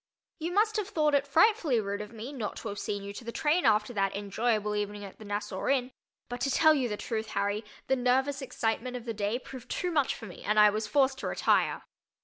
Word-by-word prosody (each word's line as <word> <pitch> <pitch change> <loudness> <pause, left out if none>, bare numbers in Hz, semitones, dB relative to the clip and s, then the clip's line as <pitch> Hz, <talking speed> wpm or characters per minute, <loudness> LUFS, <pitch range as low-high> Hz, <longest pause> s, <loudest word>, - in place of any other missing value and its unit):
You 330 +2 -3
must 425 +3 +2
have 415 -3 -1
thought 305 -5 +2
it 285 0 +2
frightfully 320 - +4
rude 200 -1 -3
of 210 0 -8
me 235 +5 -7
not 225 -7 -4
to 225 - -6
have 200 0 -5
seen 205 -1 -3
you 200 0 -6
to 220 - -8
the 235 - -5
train 310 +6 +1
after 215 +2 +3
that 195 -2 0
enjoyable 210 +1 0
evening 205 0 -3
at 195 - -12
the 215 - -10
Nassau 205 -2 -3
Inn, 260 -2 +1 0.4
but 245 0 -6
to 275 - +1
tell 315 +3 +5
you 260 -5 0
the 210 - -3
truth, 220 0 -3
Harry, 205 +1 -1 0.2
the 265 - +2
nervous 265 +3 +1
excitement 250 0 -2
of 240 - -10
the 230 - -3
day 210 +2 -1
proved 255 0 -10
too 360 - -1
much 290 -5 +1
for - - -9
me 180 - -10
and 210 +1 +2
I 210 0 +8
was 215 +1 -2
forced 265 +2 +2
to - - -3
retire. - - +2
235 Hz, 240 wpm, -29 LUFS, 210-275 Hz, 0.4 s, I